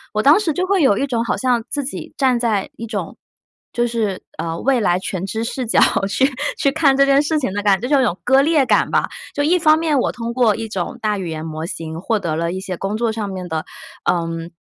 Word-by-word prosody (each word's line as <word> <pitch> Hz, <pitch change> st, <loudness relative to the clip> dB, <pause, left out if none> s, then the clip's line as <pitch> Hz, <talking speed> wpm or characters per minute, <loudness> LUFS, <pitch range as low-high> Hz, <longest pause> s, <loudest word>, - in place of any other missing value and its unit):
我 215 Hz, -, +1 dB
当 295 Hz, +7 st, +6 dB
时 360 Hz, -7 st, 0 dB
就 365 Hz, +5 st, -1 dB
会 385 Hz, -1 st, +2 dB
有 235 Hz, -9 st, +4 dB
一 275 Hz, -, +1 dB
种 240 Hz, -4 st, -1 dB
好 235 Hz, -, -1 dB
像 250 Hz, -3 st, +1 dB
自 285 Hz, -, -2 dB
己 270 Hz, -, -7 dB
站 255 Hz, -3 st, +2 dB
在 220 Hz, -5 st, 0 dB
一 230 Hz, -, -7 dB
种 200 Hz, -6 st, -4 dB, 0.6 s
就 240 Hz, -, 0 dB
是， 225 Hz, -5 st, -2 dB, 0.2 s
呃， 165 Hz, 0 st, -3 dB
未 265 Hz, -1 st, +2 dB
来 180 Hz, -5 st, +2 dB
全 185 Hz, -1 st, -4 dB
知 220 Hz, +3 st, -3 dB
视 245 Hz, +1 st, -3 dB
角 -, -, +3 dB, 0.3 s
去 225 Hz, +6 st, +2 dB, 0.3 s
去 275 Hz, -, +2 dB
看 285 Hz, -3 st, +3 dB
这 275 Hz, -, +5 dB
件 275 Hz, 0 st, +4 dB
事 310 Hz, +1 st, 0 dB
情 255 Hz, -9 st, -2 dB
的 205 Hz, -, -2 dB
感 200 Hz, -2 st, +3 dB
觉， 245 Hz, -, -3 dB
就 285 Hz, +1 st, +3 dB
是 -, -, +4 dB
有 -, -, +3 dB
种 175 Hz, -, -7 dB
割 265 Hz, +2 st, +5 dB
裂 300 Hz, -1 st, +3 dB
感 -, -, +2 dB
吧。 -, -, +1 dB, 0.3 s
就 290 Hz, -, 0 dB
一 350 Hz, +5 st, +3 dB
方 310 Hz, -2 st, +5 dB
面 315 Hz, -4 st, +1 dB
我 -, -, 0 dB
通 235 Hz, 0 st, -5 dB
过 235 Hz, -4 st, +3 dB
一 225 Hz, 0 st, -5 dB
种 205 Hz, +4 st, -4 dB
大 210 Hz, -2 st, 0 dB
语 185 Hz, -, -4 dB
言 160 Hz, 0 st, -5 dB
模 155 Hz, 0 st, -5 dB
型 160 Hz, -2 st, -6 dB
获 220 Hz, +3 st, 0 dB
得 165 Hz, -5 st, -2 dB
了 170 Hz, +1 st, -1 dB
一 185 Hz, -, -4 dB
些 190 Hz, -1 st, -5 dB
工 195 Hz, +4 st, -3 dB
作 230 Hz, 0 st, 0 dB
上 215 Hz, -2 st, -4 dB
面 185 Hz, -2 st, -6 dB
的， 160 Hz, -2 st, -3 dB, 0.4 s
嗯， 165 Hz, -1 st, -1 dB
230 Hz, 280 characters per minute, -19 LUFS, 190-275 Hz, 0.6 s, 当